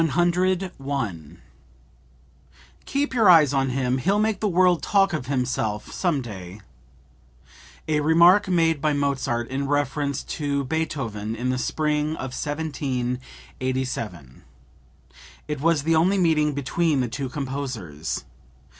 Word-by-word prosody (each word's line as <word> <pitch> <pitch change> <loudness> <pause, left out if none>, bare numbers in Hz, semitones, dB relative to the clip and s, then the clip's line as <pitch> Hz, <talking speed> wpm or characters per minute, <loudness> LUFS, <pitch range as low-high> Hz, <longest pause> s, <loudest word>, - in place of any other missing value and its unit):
101. 180 +3 +1 2.1
"Keep 280 0 -1
your 225 -6 +4
eyes 155 -5 +7
on 135 -1 +1
him; 130 0 0
he'll 195 +10 +1
make 215 0 +1
the 215 - 0
world 180 -1 +3
talk 195 -2 +2
of 150 -5 -3
himself 125 -6 -2
some 165 -8 0
day!" 95 -3 -9 1.3
(A 155 -1 +1
remark 170 +6 +5
made 165 -4 +2
by 155 0 +2
Mozart 135 -4 -1
in 135 +1 -2
reference 145 0 -1
to 140 -2 -2
Beethoven 125 -8 -3
in 125 +3 -1
the 130 - -1
spring 150 +2 0
of 130 -4 -6
1787. 130 - -4 1.1
It 150 -2 -4
was 160 -2 +2
the 165 +1 +2
only 180 +5 +3
meeting 155 -4 +2
between 145 +1 0
the 125 - 0
two 130 +3 -4
composers. 130 - -4
145 Hz, 120 wpm, -24 LUFS, 130-165 Hz, 2.1 s, eyes